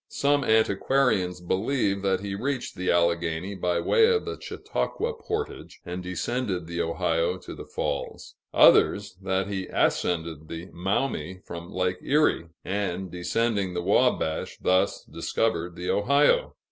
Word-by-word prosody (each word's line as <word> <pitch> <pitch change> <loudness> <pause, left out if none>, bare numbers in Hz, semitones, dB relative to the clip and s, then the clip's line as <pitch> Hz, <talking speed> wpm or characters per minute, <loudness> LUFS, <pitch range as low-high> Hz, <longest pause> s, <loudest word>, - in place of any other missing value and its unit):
Some 145 0 +2
antiquarians 110 -3 +2
believe 100 +2 0
that 95 -1 +1
he 100 -1 -4
reached 125 +5 -2
the 90 -1 -3
Alleghany 85 +1 +1
by 90 -2 0
way 445 - +4
of 445 -1 +1
the - - -5
Chautauqua 470 +1 -3
portage, 440 -1 -5
and 90 +1 -5
descended 90 0 -2
the 85 +1 -3
Ohio 85 +1 0
to - - -9
the - - -9
Falls; - - -4 0.2
others, 100 -2 +5
that 95 0 0
he 95 -2 -3
ascended 80 -3 0
the 85 +3 -7
Maumee 95 - -2
from 85 +2 -8
Lake 90 -1 -1
Erie, 145 - +2 0.2
and, 95 -2 -2
descending 100 +1 -1
the 85 - -2
Wabash, 100 -5 +1
thus, 95 +2 +1
discovered 85 -6 -2
the 90 0 -2
Ohio. 140 +8 +3
95 Hz, 135 wpm, -26 LUFS, 85-110 Hz, 0.2 s, others